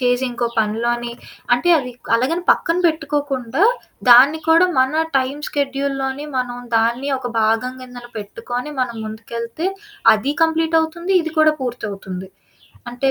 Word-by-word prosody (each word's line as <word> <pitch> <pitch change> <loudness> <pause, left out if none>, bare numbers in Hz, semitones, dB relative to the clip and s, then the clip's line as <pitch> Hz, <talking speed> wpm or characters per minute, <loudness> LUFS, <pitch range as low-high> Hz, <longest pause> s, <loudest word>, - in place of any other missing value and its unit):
చేసి 245 +1 +1
ఇంకో 240 0 -2
పనిలోని 235 +2 -1 0.4
అంటే 245 +8 +2
అదిక్ 250 -4 -6
అలాగని 280 +9 +1
పక్కన 330 +1 +2
పెట్టుకోకుండా, 290 - -1 0.5
దాన్ని 265 +6 +8
కూడా 330 +3 +6
మన 275 +5 +3
టైం 265 +1 0
షెడ్యూల్లోని 275 0 -2
మనం 245 -1 -2 0.2
దాన్ని 235 +5 +1
ఒక 250 -1 -5
భాగం 225 +3 +1
కింద 250 -1 -10 0.2
పెట్టుకొని, 245 +6 -5
మనం 240 -2 -2
ముందుకెళ్తే, 230 +8 -4 0.5
అది 260 +7 -1
కంప్లీట్ 325 0 +2
అవుతుంది, 340 +4 -2
ఇది 320 -1 -5
కూడా 310 0 +5
పూర్తవుతుంది. 200 -6 -5 0.6
అంటే 260 +3 0
255 Hz, 130 wpm, -19 LUFS, 235-295 Hz, 0.6 s, దాన్ని